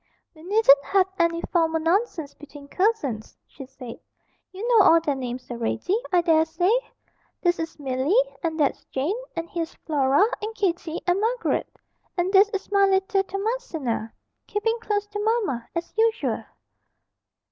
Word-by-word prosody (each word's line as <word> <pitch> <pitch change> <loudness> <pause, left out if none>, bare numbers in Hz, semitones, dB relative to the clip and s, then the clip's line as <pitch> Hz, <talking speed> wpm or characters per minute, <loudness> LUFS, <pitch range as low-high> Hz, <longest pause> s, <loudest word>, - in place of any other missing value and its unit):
'We 315 - -17
needn't 355 -6 +5
have 390 -1 +3
any 335 0 +1
formal 325 -2 +2
nonsense 330 -3 0
between 290 -1 -13
cousins,' 290 - -1
she 270 -3 -11
said; 255 -3 -10 0.5
'you 395 +5 -5
know 460 -4 +6
all 330 - +7
their 305 -3 -1
names 255 -1 -6
already, 240 - -1 0.2
I 355 -2 +4
dare 320 -2 +3
say. 340 +4 +1 0.7
This 350 -1 +2
is 325 0 -5
Milly, 270 +4 -1 0.3
and 325 -2 -2
that's 285 -3 +1
Jane; 290 +10 -2 0.2
and 330 0 -3
here's 335 -2 -4
Flora, 285 +3 +3 0.2
and 435 +1 -5
Kitty, 345 -5 -2
and 360 +2 +1
Margaret, 475 +3 0 0.5
and 360 +2 0
this 400 +2 +6
is 395 -2 -5
my 400 -1 +4
little 385 +1 +2
Thomasina, 385 - -3 0.4
keeping 450 +3 -1
close 415 -2 -1
to 415 0 -6
mamma, 410 - 0
as 335 0 -4
usual.' 450 +1 +1
345 Hz, 150 wpm, -24 LUFS, 290-410 Hz, 0.7 s, all